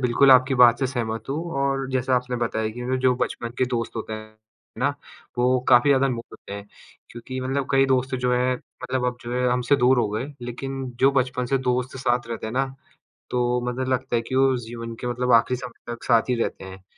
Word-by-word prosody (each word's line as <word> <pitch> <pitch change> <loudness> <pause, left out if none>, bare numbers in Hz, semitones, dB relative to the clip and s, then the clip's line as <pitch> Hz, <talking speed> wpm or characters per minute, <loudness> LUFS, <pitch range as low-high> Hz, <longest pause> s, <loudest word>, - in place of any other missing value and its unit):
बिल्कुल 130 +2 +4
आपकी 130 +1 +6
बात 120 -1 +6
से 135 - +1
सहमत 115 -2 -4
हूँ 140 - -1 0.2
और 135 -1 0
जैसा 130 0 +1
आपने 125 0 -2
बताया 110 -2 -1
कि 125 +1 -1
जो 130 -1 +4
बचपन 120 -1 -2
के 130 - +3
दोस्त 115 -2 -3
होते 110 0 -4
हैं 110 0 -8 0.4
ना, - - +2 0.5
वो 125 +1 +3
काफ़ी 125 +3 +6
ज़्यादा 135 0 +4
अनमोल 120 -3 -2
होते - - -11
हैं। 100 0 -7 0.4
क्योंकि 130 +2 -6
मतलब 135 +1 -1
कई 135 0 +4
दोस्त 130 0 +1
जो 125 -1 0
हैं, 125 +1 +2 0.3
मतलब 125 0 -1
अब 125 - -1
जो 120 +1 -6
हैं 125 0 +1
हमसे 125 +3 +2
दूर 125 0 +4
हो 110 - +2
गए, 110 +6 -2 0.2
लेकिन 135 +2 -5 0.2
जो 135 +1 +6
बचपन 130 -1 0
से 135 +2 +1
दोस्त 125 0 -1
साथ 120 -2 0
रहते 115 -1 -4
हैं 110 - -5
ना, 135 +1 +1 0.7
तो 125 0 +1
मतलब 130 +1 -3
लगता 130 -1 -1
है 115 - +2
कि 130 +3 -5
वो 135 0 +4
जीवन 115 0 -7
के 125 - -3
मतलब 125 +1 -1
आखिरी 115 +2 +4
समय 120 -1 -8
तक 120 - -11
साथ 115 0 +3
ही 125 - +2
रहते 95 - -3
हैं। 95 0 -11
125 Hz, 225 wpm, -24 LUFS, 120-130 Hz, 0.7 s, आपकी